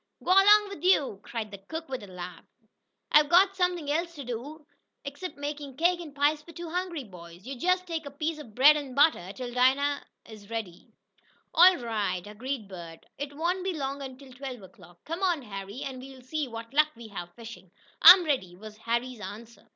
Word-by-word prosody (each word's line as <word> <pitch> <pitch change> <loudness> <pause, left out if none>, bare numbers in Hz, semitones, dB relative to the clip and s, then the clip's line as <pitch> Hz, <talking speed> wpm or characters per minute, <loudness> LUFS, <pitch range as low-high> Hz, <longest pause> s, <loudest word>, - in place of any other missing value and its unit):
"Go - - 0
'long 410 +2 +7
wif 375 -5 -9
yo'!" 295 - +3
cried 215 +1 -6
the 200 - -9
cook 320 +12 -7
with 260 -1 -5
a 205 - -10
laugh. 180 -2 -9 0.7
"I'se 300 0 +6
got 380 +5 +5
suffin 360 -4 0
else 335 +4 -1
t' 285 - -7
do 270 +6 -7 0.5
'cept 365 +3 -7
make 290 +1 -4 0.2
cake 345 +3 +2
an' 300 -4 -10
pies 295 +1 +2
fo' 335 +2 -14
two 335 +1 -7
hungry 355 -4 -3
boys. 175 -3 -13
Yo' 270 - -5
jest 365 +7 +1
take 325 -4 -4
a - - -5
piece 310 +3 -3
ob 230 -8 -12
bread 290 +4 +7
an' 280 -4 -5
butter 280 - +3
'till 245 +2 -7
dinnah 270 +3 +2 0.2
am 215 -3 -13
ready." 215 -6 -6 0.6
"All 360 +2 +7
right," 210 -7 -2
agreed 225 +2 -5
Bert. 170 -4 -10
"It 285 0 -5
won't 355 +3 -1
be 380 -1 -1
long 275 0 -3
until 265 0 -10
twelve 250 -4 -7
o'clock. 175 -2 -17
Come 330 +4 -5
on, 350 -7 +1
Harry, 200 +1 -7
and 260 -2 -6
we'll 265 -1 -12
see 300 +2 -3
what 230 0 -9
luck 305 +1 +4
we 230 -1 -11
have 175 -4 -8
fishing." 230 -5 -11 0.3
"I'm 360 -1 +10
ready," 255 - -1
was 215 +3 -11
Harry's 235 +2 -2
answer. 215 +4 -10
270 Hz, 195 wpm, -28 LUFS, 215-320 Hz, 0.7 s, I'm